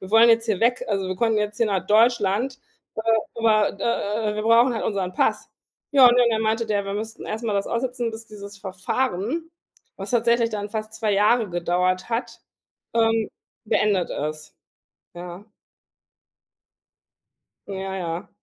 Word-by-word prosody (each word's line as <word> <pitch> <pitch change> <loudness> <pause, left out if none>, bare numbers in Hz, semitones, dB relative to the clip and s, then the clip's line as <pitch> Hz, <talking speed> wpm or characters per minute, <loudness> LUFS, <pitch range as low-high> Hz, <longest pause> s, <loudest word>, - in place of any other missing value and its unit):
„Wir 190 - -9
wollen 225 +2 +7
jetzt 230 0 +4
hier 210 -4 0
weg, 245 +2 +2
also, 195 -3 -1
wir 185 - -2
konnten 225 +1 +1
jetzt 210 +1 -3
hier 230 - +3
nach 195 -3 -1
Deutschland, 230 +3 +2 0.4
äh, - - -1 0.3
aber, 215 -3 +2
äh, 215 -2 -1
äh, - - -6
wir 215 - -3
brauchen 235 +2 +4
halt - - -3
unseren 190 -4 -2
Pass.“ - - 0 0.4
Ja, 265 -3 +8
und 240 - +3
dann 235 -2 +3
meinte 220 +1 0
der, 205 -2 0
wir 195 - -4
müssten 220 +2 -6
erst 220 +2 -4
mal 220 - -1
das 200 0 0
aussetzen, 240 0 -2
bis 225 0 -9
dieses 205 -1 -10
Verfahren, 215 - -3 0.5
was 195 +1 -7
tatsächlich 235 -1 +2
dann 205 -1 -4
fast 215 0 -5
2 220 -2 -1
Jahre 215 +2 +3
gedauert 180 +2 0
hat, 235 +2 -3 0.5
ähm, 225 -1 +2 0.4
beendet 205 -4 +1
ist, 155 +1 -5 0.6
ja? 175 +2 -9 2.2
Ja, 195 -1 -5
ja. 170 -2 -4
215 Hz, 160 wpm, -23 LUFS, 195-230 Hz, 2.2 s, Ja